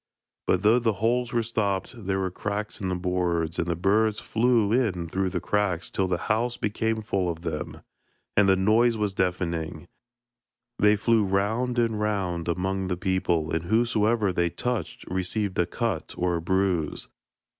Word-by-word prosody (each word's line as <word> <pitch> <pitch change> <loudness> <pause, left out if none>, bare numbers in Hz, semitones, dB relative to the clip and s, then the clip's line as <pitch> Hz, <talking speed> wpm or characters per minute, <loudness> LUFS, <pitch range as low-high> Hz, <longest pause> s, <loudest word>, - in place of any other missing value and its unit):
But 95 +1 +2
though 110 +4 +5
the 115 -2 +1
holes 120 +3 +1
were 115 -1 +1
stopped, 100 -4 -1
there 100 -4 -2
were 95 -1 -1
cracks 105 +3 -4
in 95 - -1
the 90 - 0
boards, 90 -2 -1
and 85 - 0
the 85 - 0
birds 105 +5 +2
flew 115 -2 +2
in 100 -9 +1
through 95 +3 -1
the - - -2
cracks 95 -5 -1
till 95 - 0
the 90 -1 0
house 120 +3 0
became 110 +1 -1
full 95 -4 0
of 85 0 -5
them, 80 -3 -4 0.5
and 100 -1 +5
the 95 - +6
noise 110 +5 +3
was 105 -2 -1
deafening. 85 -3 -2 0.9
They 105 +1 +5
flew 110 +1 +2
round 110 +6 0
and 115 -3 +1
round 95 -6 -1
among 95 +2 -1
the 90 -1 -2
people, 90 -4 0
and 80 +1 -1
whosoever 110 -1 +2
they 85 0 +1
touched 120 +5 -3
received 95 +2 -2
a 85 - +3
cut 100 -3 -3
or 90 0 +1
a - - -4
bruise. 95 -3 0
95 Hz, 170 wpm, -26 LUFS, 90-110 Hz, 0.9 s, the